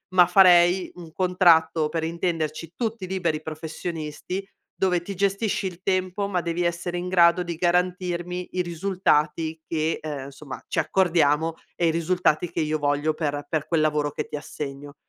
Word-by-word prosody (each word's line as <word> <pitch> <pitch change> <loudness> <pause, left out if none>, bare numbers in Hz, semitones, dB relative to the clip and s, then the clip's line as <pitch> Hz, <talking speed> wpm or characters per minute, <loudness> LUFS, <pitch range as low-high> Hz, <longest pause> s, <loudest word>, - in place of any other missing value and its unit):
ma 180 -1 +8
farei 180 0 +5
un 170 -2 -11
contratto, 170 -4 +3
per 160 +1 -2
intenderci, 165 -1 -2
tutti 225 -4 -3
liberi 175 -5 -1
professionisti, 160 +3 -5 0.3
dove 180 -2 +1
ti 200 - -5
gestisci 200 +1 0
il 180 -1 -9
tempo, 185 +1 0
ma 185 -3 -1
devi 170 +1 -2
essere 175 +1 -2
in 175 +1 -4
grado 175 -1 +5
di 175 -1 -4
garantirmi 180 0 -1
i 185 - +1
risultati 165 -3 0
che 160 0 -1
uhm, 145 -3 -5
insomma, 140 0 -10
ci - - -1
accordiamo, 165 -4 +2 0.2
e 170 - +1
i - - +3
risultati 170 0 +1
che - - -1
io 155 0 -1
voglio 145 +2 +1
per 145 -2 -3
per 155 -2 -1
quel 165 -1 +1
lavoro 150 -1 +1
che - - -4
ti - - -5
assegno. 145 -1 -7
170 Hz, 165 wpm, -24 LUFS, 155-180 Hz, 0.3 s, ma